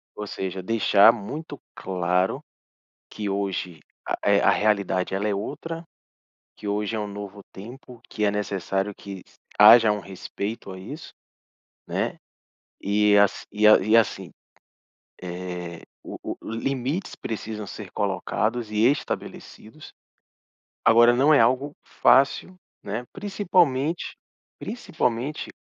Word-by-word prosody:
Ou 105 - -6
seja, 95 -1 -4
deixar 105 +1 +5
muito 145 +7 -7
claro 90 0 -1 0.7
que 105 -1 -5
hoje, 95 -4 -3 0.4
eh, - - +4
a - - +4
realidade, 100 -4 +1
ela 100 +2 -1
é 105 - 0
outra, 165 +10 -5 0.7
que 105 - -9
hoje 105 +2 -1
é - - -2
um 105 - -3
novo 100 0 -8
tempo, 120 +4 -12
que 105 - -3
é 100 - +2
necessário 100 -1 -2
que 100 -2 -9
s - - -25 0.2
haja 110 +1 +9
um 105 - -2
respeito 100 +2 -6
a 95 - -9
isso, 140 - -9 0.7
né, - - -2 0.6
e 105 +1 +3
ass 100 -1 +2
e 105 +1 +1
a 110 - +9
e 110 +4 +2
assim, 95 -5 +1 0.9
eh, 90 -1 -6 0.2
o - - -7 0.2
o - - -8
limites 135 +9 -2
precisam 110 -2 -5
ser 100 -1 -9
colocados 105 +4 -2
e 105 +1 +1
estabelecidos. 145 -1 -6 0.9
Agora 120 +1 +6
não 140 +5 +4
é 145 - +6
algo 130 +5 +2
fácil, 140 +7 +3 0.3
né, 110 +5 -4
principalmente 175 -7 0 0.4
principalmente 145 - -3
105 Hz, 125 wpm, -24 LUFS, 100-125 Hz, 0.9 s, haja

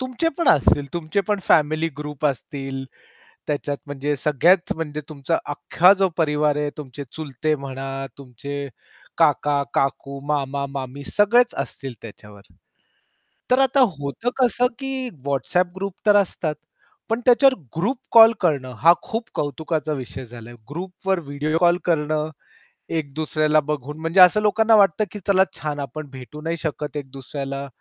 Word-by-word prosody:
तुमचे 255 +6 -1
पण 335 - +2
असतील 145 0 +4
तुमचे 170 +3 -1
पण 205 -1 +1
फॅमिली 155 +1 +3
ग्रुप 150 0 -3
असतील, 135 -1 -4 0.6
त्याच्यात 145 -1 -2
म्हणजे 145 +1 -2
सगळ्यात 170 +5 +3
म्हणजे 150 -2 -4
तुमचा 155 +2 -1
अख्खा 175 +6 +4
जो 190 - +4
परिवार 150 -2 +1
आहे, 150 0 -1
तुमचे 140 -1 -8
चुलते 155 0 -2
म्हणा, 135 -1 -6 0.3
तुमचे 140 +2 -6 0.5
काका-काकू, 140 -1 +1
मामा-मामी 140 -1 -3
सगळेच 235 +4 +4
असतील 135 -2 -9
त्याच्यावर. 105 -2 -12 1.1
तर 255 - +5
आता 270 +1 +4 0.2
होतं 145 - -3
कसं, 245 0 +3
की 270 -2 -3 0.2
WhatsApp 175 +6 0
ग्रुप 195 -1 -4
तर 205 -1 +6
असतात. 175 -6 0 0.5
पण 225 +2 0
त्याच्यावर 260 +2 +6 0.2
ग्रुप 215 +11 0 0.2
कॉल 225 0 +9
करणं, 140 -8 0
हा 165 +2 +7
खूप 230 -1 -4
कौतुकाचा 155 +2 -2
विषय 130 -2 -6
झालाय. 120 0 -11 0.2
ग्रुपवर 185 +3 -2
व्हिडिओ 150 +3 -1
कॉल 175 0 +4
करणं, 155 -2 0 0.6
एक 155 -4 -3
दुसऱ्याला 155 0 +2
बघून 150 +1 -4
म्हणजे 165 +4 +2
असं 180 +4 +7
लोकांना 220 +2 +3
वाटतं, 200 +1 +4
की 210 - -6
चला 190 -1 +5 0.2
छान 150 -1 -3
आपण 145 +2 -6
भेटू 130 +2 -10
नाही 165 +2 -2
शकत 150 -2 -4
एक 140 -2 -5
दुसऱ्याला, 140 0 -5
150 Hz, 140 wpm, -22 LUFS, 140-185 Hz, 1.1 s, कॉल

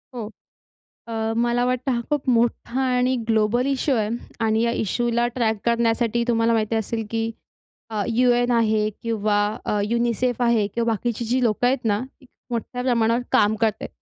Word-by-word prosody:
हो. 235 -3 -4 0.8
अ, 225 0 -2
मला 240 +1 +1
वाटतं, 255 +1 0
हा 235 - 0
खूप 290 -2 -1
मोठा 240 +1 +1
आणि 255 0 +2
ग्लोबल 225 +3 +2
इश्यू 275 0 +1
आहे 210 -1 0 0.4
आणि 220 0 +2
या 235 - +2
इश्यूला 235 +3 0
ट्रॅक 225 -3 +1
करण्यासाठी, 235 0 +1
तुम्हाला 230 -1 +2
माहिती 225 0 0
असेल, 225 +1 -2
की 225 0 -1 0.6
अ, 215 -2 -1 0.2
UN 245 -1 +3
आहे 220 -2 +2
किंवा 215 -2 0 0.3
अ, - - -1 0.2
UNICEF 240 +1 0
आहे 235 -3 +3
किंवा 230 +3 -2
बाकीची 235 +2 -2
जी 250 +3 0
लोकं 235 +1 +1
आहेत 250 -1 +1
ना, 205 -1 +1 0.2
ती 260 - -18 0.2
मोठ्या 245 +1 -3
प्रमाणावर 235 -1 +2
काम 210 +1 +4
करत 220 -2 +3
आहेत. - - -5
235 Hz, 165 wpm, -23 LUFS, 220-245 Hz, 0.8 s, काम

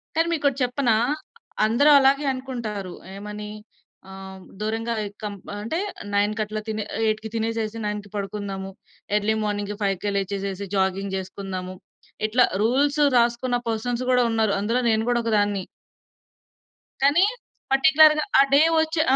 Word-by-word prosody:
కానీ 330 +1 +2
మీకోటి 280 -4 +1
చెప్పనా! 245 -2 +1 0.7
అందరూ 240 +7 +4
అలాగే 275 +2 +3
అనుకుంటారు. 225 -8 -5 0.2
ఏమని 210 +1 -7 0.6
ఆహ్, 190 0 -9 0.2
దూరంగా 225 +2 -2
ఎ - - -3 0.2
కం 205 -1 -3 0.2
అంటే 230 - -3 0.3
9కి 210 +2 +1
అట్లా 215 0 -5
తినే 215 -1 -2 0.2
8కి 220 0 0
తినేసేసి, 225 0 -2
9కి 210 -1 -4
పడుకుందాము. 195 -1 -4 0.5
Early 210 +1 +1
morning 205 0 -2
5కే 200 0 -1
లేచేసేసి 200 0 -3
jogging 190 +1 0
జేసుకుందాము. 190 -1 -5 0.5
ఇట్లా 245 +3 +4 0.2
రూల్స్ 280 +6 +2 0.2
రాసుకున్న 240 +1 +1
పర్సన్స్ 235 +2 -2
గూడా 250 -1 +4
ఉన్నారు. 220 -2 +1
అందులో 230 +5 0
నేను 220 0 +2
గూడా 240 -1 +2
ఒకదాన్ని. 205 -3 +1 1.4
కానీ 300 +7 +5 0.5
పర్టిక్యులర్‌గా 305 +2 +6 0.2
ఆ - - +9
డే 285 - +7 0.2
వచ్చే 320 0 0
220 Hz, 125 wpm, -24 LUFS, 200-250 Hz, 1.4 s, ఆ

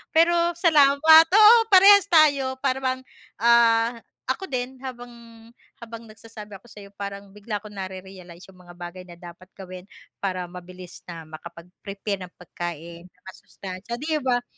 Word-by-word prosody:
Pero 340 +1 +4 0.2
salamat, 315 0 +5
oo, 430 +3 +7 0.2
parehas 395 +1 +7
tayo, 280 -5 +2
para 265 -1 -2
bang, 260 0 -2 0.4
ah, 235 0 +3 0.3
ako 385 - -3
din, 255 +1 -4
habang 245 -2 -9 0.7
habang 230 0 -11
nagsasabi 215 -1 -13
ako 240 - -23
sa'yo, 200 -2 -14
parang 200 0 -9
bigla 210 +1 -6
ko - - -10
nare-realize 185 -2 -11
'yung 185 -1 -19
mga 175 0 -16
bagay 175 +1 -10
na 175 0 -15
dapat 175 +1 -14
gawin 185 -2 -11 0.4
para 185 -2 -4
mabilis 180 0 -12
na 165 -2 -9
makapag-prepare 180 +5 -9
ng - - -27
pagkain 170 -1 -9
na 180 - -33
masustansiya, 190 +5 -10
'di 310 +1 -2
ba. 245 -2 -1
210 Hz, 145 wpm, -23 LUFS, 185-260 Hz, 0.7 s, oo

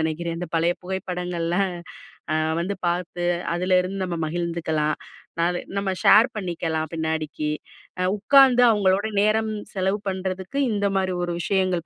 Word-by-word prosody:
நினைக்கிறேன். 165 +1 -2
இந்த 175 - -5
பழைய 170 +2 +2
புகைப்படங்கள்ல. 180 -2 -3 0.8
ஆ - - +2 0.3
வந்து 200 +3 -2
பார்த்து 175 0 -3 0.3
அதுல 185 +1 +1
இருந்து 190 +1 -3
நம்ம 175 -2 -3
மகிழ்ந்துக்கலாம்.ந 160 -2 -3
அது 175 - -2 0.2
நம்ம 200 -1 -1
ஷேர் 225 +3 +7
பணிக்கெல்லா 170 -5 -2
பின்னாடிக்கி. 160 -1 -2 0.7
உட்கார்ந்து 255 +3 +6
அவங்களோட 200 -2 +2 0.2
நேரம் 220 +1 +2 0.2
செலவு 190 +1 0
பண்றதுக்கு 190 +4 -4
இந்த 205 -1 0
மாரி 190 -1 0
ஒரு 175 0 -2
விஷயங்கள் 185 -2 0
180 Hz, 125 wpm, -24 LUFS, 170-195 Hz, 0.8 s, ஷேர்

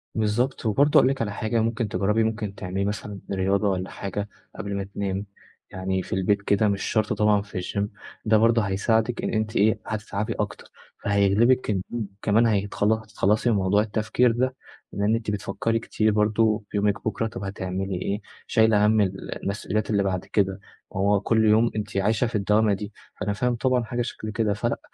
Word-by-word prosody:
بالضبط. 115 +5 0
وبرضه 140 +7 +4
هاقول 130 - +4
لِك 135 -2 -2
على 105 -2 -1
حاجة، 110 +3 -1
ممكن 115 0 -1
تجرّبي 105 +2 +1
ممكن 110 -2 -2
تعملي 95 +1 -3
مثلًا 105 0 -4
رياضة 100 +1 +1
والّا 95 -1 -2
حاجة 100 +1 -5 0.3
قبل 100 0 -4
ما 100 - -2
تنامي، 100 0 -3 0.5
يعني 95 0 -2
في - - -6
البيت 95 +2 +1
كده، 100 +2 +2
مش 100 -1 0
شرط 110 -1 0
طبعًا 105 -1 +3
في 100 -2 -6
الgym. 100 +3 -2 0.4
ده 110 0 +5
برضه 115 +1 +4
هيساعدِك 110 +4 0
إن - - 0
أنتِ 110 0 -1
إيه، 110 +2 +3
هتتعبي 105 -1 -3
أكتر، - - -5 0.3
فهيغلبِك 100 +6 +3
النوم 105 +3 -2
كمان 110 +3 +3
هيتخلص 105 0 +1
هتتخلّصي 110 +1 0
من 115 - +3
موضوع 100 +1 +3
التفكير 110 +3 +1
ده، 130 +3 0 0.4
لإن 105 +2 +1
أنتِ 110 -2 -2
بتفكّري 105 +3 -1
كتير 110 -1 0
برضه 105 +1 +2
في - - -3
يومِك 100 0 0
بكرا، 115 +1 -1
طب 100 - -7
هتعملي 95 -1 -3
إيه؟ 100 +2 -2 0.3
شايلة 110 -2 +4
هَم 110 0 +4
ال 95 -1 -3
المسؤوليات 105 +1 -2
اللي 100 -2 +2
بعد 95 -2 -2
كده، 95 -1 0 0.4
ما 95 - -1
هو 100 +1 +3
كل 110 +1 +2
يوم 110 +2 +4
أنتِ 105 -2 -3
عايشة 110 +5 +2
في 115 - -5
الدوامة 105 +1 +3
دي، 105 +1 -5 0.3
فأنا 105 0 -1
فاهم 125 +4 0
طبعًا 125 0 +1
حاجة 120 +1 -3
شكل 110 -2 -5
كده. 110 -1 0
فلأ، 105 - -2
105 Hz, 185 wpm, -25 LUFS, 100-110 Hz, 0.5 s, ده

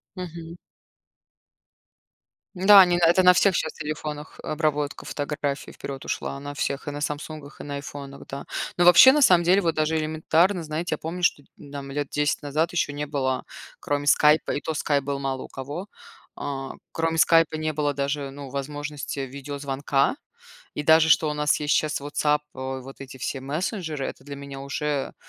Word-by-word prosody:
Мгм. 170 -2 -8 2.0
Н-да, 195 +2 +8
они 175 -1 +4
на 175 - +3
это 175 +3 +5
на 180 - +9
всех 190 +1 +3
щас 160 - -1
телефонах 150 0 -6
обработка 150 -2 -1
фотографий 145 -2 -3
вперед 135 0 -7
ушла, 140 - -3
на 145 0 -6
всех: 140 0 -3
и - - -2
на 145 - -6
"Самсунгах", 150 0 -5
и - - -7
на 145 -1 -5
"Айфонах". 140 -1 -8
Да. 140 - -7 0.3
Но 175 - +4
вообще, 180 +10 +9
на 300 - +2
самом 180 -9 +6
деле, 185 +3 +5
вот 165 -3 +1
даже 155 +1 +1
элементарно, 160 +4 +1
знаете, 160 +3 -2
я - - -12
помню, 175 +3 -6
что 145 - +2
дь - - -29
нь 140 - -13
там 140 -1 -7
10 145 0 -3 0.2
лет - - -29
назад 155 +4 -1
ещё 170 -4 0
не 145 +1 -4
было 130 -3 -1 0.4
кроме 145 0 -2
"Скайпа", 150 +1 +4
и - - -1
то 160 - -4
Skype 145 -1 0
был 140 0 -3
мало 135 -1 -3
у - - -9
кого, 145 +9 -7 0.5
а, 135 -2 -5 0.2
кроме 165 0 -1
"Скайпа" 165 -1 +4
не 155 0 -1
было 145 -1 -1
даже, 140 0 -2
ну, 140 0 -9
возможности 145 +1 -5
видеозвонка, 140 - -1 0.6
и 150 - -4
даже 160 +1 +6
что 160 0 +4
у - - -2
нас 150 0 +1
есть 150 -1 +1
щас 155 -2 0
WhatsApp, 150 +1 +1
а, 130 0 -4
вот 135 +1 -12
эти 135 -1 -9
все 130 +2 -4
мессенджеры- 155 - -3
это - - -8
для 140 +1 -8
меня 140 -1 -8
уже, 140 0 -3
150 Hz, 185 wpm, -25 LUFS, 140-160 Hz, 2.0 s, на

